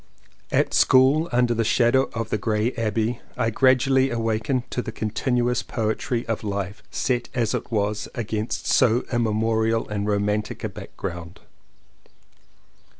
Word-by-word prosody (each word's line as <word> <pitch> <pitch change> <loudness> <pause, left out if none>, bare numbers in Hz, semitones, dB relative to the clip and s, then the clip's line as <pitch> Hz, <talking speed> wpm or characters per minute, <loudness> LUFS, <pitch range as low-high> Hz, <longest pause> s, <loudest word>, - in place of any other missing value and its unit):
At - - +1
school 135 +6 +4
under 120 -1 +2
the 115 0 0
shadow 120 +4 +3
of 115 -1 -3
the 105 - 0
grey 110 +3 0
abbey 115 +1 -1 0.2
I 115 - +1
gradually 130 +2 +3
awakened 115 +1 -1
to 125 - -1
the 120 - -6
contin 115 +3 -1
uous 120 0 +1
poetry 115 +2 -2
of 115 -1 -3
life 100 -1 -4
set 125 -2 -1
as 115 -3 0
it - - -4
was 105 -1 -1
against 110 -1 -3
so 120 -1 +3
immemorial 115 0 +1
and 105 0 -2
romantic 105 +1 -1
a - - -1
background. 85 -2 -8
115 Hz, 140 wpm, -24 LUFS, 105-125 Hz, 0.2 s, school